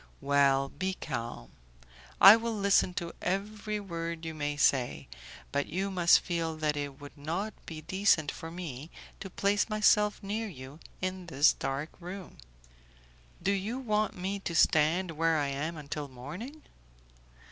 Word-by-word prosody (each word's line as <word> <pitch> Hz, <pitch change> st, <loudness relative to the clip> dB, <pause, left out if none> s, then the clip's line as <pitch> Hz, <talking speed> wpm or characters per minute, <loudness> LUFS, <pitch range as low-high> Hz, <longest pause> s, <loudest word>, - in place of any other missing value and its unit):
"Well, 140 Hz, -1 st, +3 dB
be 185 Hz, +4 st, -3 dB
calm. 115 Hz, -, -5 dB, 0.7 s
I 200 Hz, +2 st, +11 dB
will 230 Hz, 0 st, -2 dB
listen 200 Hz, -3 st, +3 dB
to 170 Hz, -2 st, -4 dB
every 210 Hz, +3 st, -2 dB
word 170 Hz, -4 st, -5 dB
you 160 Hz, -, -4 dB
may 145 Hz, -1 st, -3 dB
say, 120 Hz, -, +2 dB, 0.4 s
but 140 Hz, 0 st, 0 dB
you 190 Hz, +4 st, -2 dB
must 175 Hz, -2 st, +5 dB
feel 165 Hz, -3 st, -2 dB
that 155 Hz, -1 st, 0 dB
it 145 Hz, -1 st, -5 dB
would 145 Hz, -1 st, -11 dB
not 170 Hz, +9 st, -3 dB
be 160 Hz, -2 st, -7 dB
decent 175 Hz, -3 st, +2 dB
for 165 Hz, -, -8 dB
me 165 Hz, -4 st, -7 dB, 0.3 s
to 195 Hz, -, -7 dB
place 200 Hz, +4 st, +1 dB
myself 210 Hz, 0 st, +3 dB
near 215 Hz, +3 st, -2 dB
you 135 Hz, -4 st, -10 dB, 0.2 s
in 185 Hz, -1 st, -3 dB
this 145 Hz, -1 st, +4 dB
dark 140 Hz, +4 st, -3 dB
room." 180 Hz, +1 st, -8 dB, 1.1 s
"Do 195 Hz, -, +2 dB
you 200 Hz, +5 st, -2 dB
want 215 Hz, -6 st, 0 dB
me 195 Hz, +2 st, -3 dB
to 170 Hz, -3 st, -4 dB
stand 160 Hz, +4 st, +3 dB
where 165 Hz, 0 st, +1 dB
I 145 Hz, -2 st, 0 dB
am 155 Hz, +4 st, -3 dB
until 150 Hz, 0 st, -5 dB
morning?" 170 Hz, -, -9 dB
170 Hz, 150 wpm, -30 LUFS, 145-195 Hz, 1.1 s, I